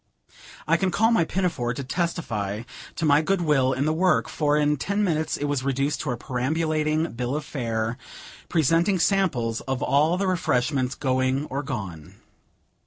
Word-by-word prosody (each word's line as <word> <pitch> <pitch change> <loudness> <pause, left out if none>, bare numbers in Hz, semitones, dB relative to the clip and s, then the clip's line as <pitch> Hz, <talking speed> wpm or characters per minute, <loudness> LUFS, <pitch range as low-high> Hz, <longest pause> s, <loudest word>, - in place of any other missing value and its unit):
I 165 +2 +4
can 190 +2 +1
call 225 +6 +2
my 200 -8 +3
pinafore 160 -11 -1
to 140 - -4
testify 120 - -2 0.3
to 165 - -2
my 145 0 +5
good 190 +3 0
will 140 -5 +2
in 135 +2 0
the 155 - +1
work, 180 +3 +2
for 150 -1 +1
in 150 0 +2
ten 200 +8 -1
minutes 160 -5 0
it 145 - -2
was 145 -2 -1
reduced 140 +2 0
to 150 - -3
a 125 - -1
perambulating 155 +5 -1
bill 125 +3 -3
of 150 -1 -3
fare, 115 -4 -2 0.5
presenting 165 +4 +2
samples 155 - +1
of 130 -1 -1
all 150 +6 +3
the 195 - 0
refreshments 135 -7 0
going 130 +1 0
or 135 +2 -1
gone. 100 - -6
145 Hz, 170 wpm, -25 LUFS, 130-165 Hz, 0.5 s, my